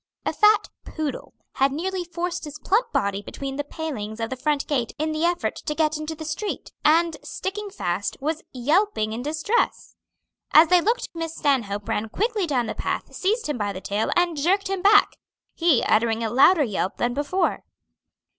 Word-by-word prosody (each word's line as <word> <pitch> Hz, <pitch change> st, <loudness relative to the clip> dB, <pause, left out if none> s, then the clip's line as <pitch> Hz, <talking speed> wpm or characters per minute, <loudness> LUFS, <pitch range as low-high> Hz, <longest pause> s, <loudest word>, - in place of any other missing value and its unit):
A -, -, 0 dB
fat 425 Hz, 0 st, +4 dB
poodle 310 Hz, -3 st, -5 dB, 0.2 s
had 270 Hz, 0 st, +3 dB
nearly 365 Hz, +5 st, -2 dB
forced 345 Hz, 0 st, -4 dB
his 295 Hz, 0 st, -8 dB
plump 420 Hz, +10 st, +1 dB
body 200 Hz, 0 st, 0 dB
between 270 Hz, +6 st, -6 dB
the 290 Hz, -, -1 dB
palings 265 Hz, -9 st, -5 dB
of 225 Hz, +1 st, -3 dB
the -, -, -1 dB
front 285 Hz, +2 st, 0 dB
gate 250 Hz, -6 st, -1 dB
in 310 Hz, +1 st, -1 dB
the 310 Hz, +1 st, -2 dB
effort 350 Hz, 0 st, 0 dB
to 300 Hz, -, -4 dB
get 310 Hz, 0 st, +1 dB
into 310 Hz, +1 st, -4 dB
the 315 Hz, 0 st, -8 dB
street, 320 Hz, +7 st, -4 dB
and 325 Hz, +1 st, +3 dB
sticking 405 Hz, +2 st, -5 dB
fast, 185 Hz, -, -3 dB
was 310 Hz, +3 st, -2 dB
yelping 270 Hz, -, +1 dB
in 230 Hz, -, -4 dB
distress. 315 Hz, -, -1 dB, 0.6 s
As 315 Hz, +1 st, +8 dB
they 360 Hz, -1 st, +6 dB
looked 460 Hz, +7 st, 0 dB
Miss 330 Hz, -1 st, -4 dB
Stanhope 210 Hz, -8 st, 0 dB
ran 215 Hz, +1 st, -1 dB
quickly 425 Hz, -, -1 dB
down 255 Hz, -5 st, +1 dB
the -, -, -3 dB
path, -, -, -3 dB
seized 420 Hz, +5 st, 0 dB
him 295 Hz, -5 st, -3 dB
by 205 Hz, -1 st, -1 dB
the 185 Hz, -, -6 dB
tail, 205 Hz, +3 st, -1 dB
and 350 Hz, -1 st, +2 dB
jerked 375 Hz, +7 st, +1 dB
him 390 Hz, -1 st, -2 dB
back, 410 Hz, +2 st, +5 dB, 0.4 s
he 330 Hz, -7 st, +3 dB
uttering 225 Hz, +1 st, +2 dB
a 220 Hz, -, -1 dB
louder 295 Hz, +7 st, +6 dB
yelp 200 Hz, -5 st, -2 dB
than 240 Hz, 0 st, 0 dB
before. 295 Hz, +8 st, 0 dB
310 Hz, 185 wpm, -24 LUFS, 245-355 Hz, 0.6 s, As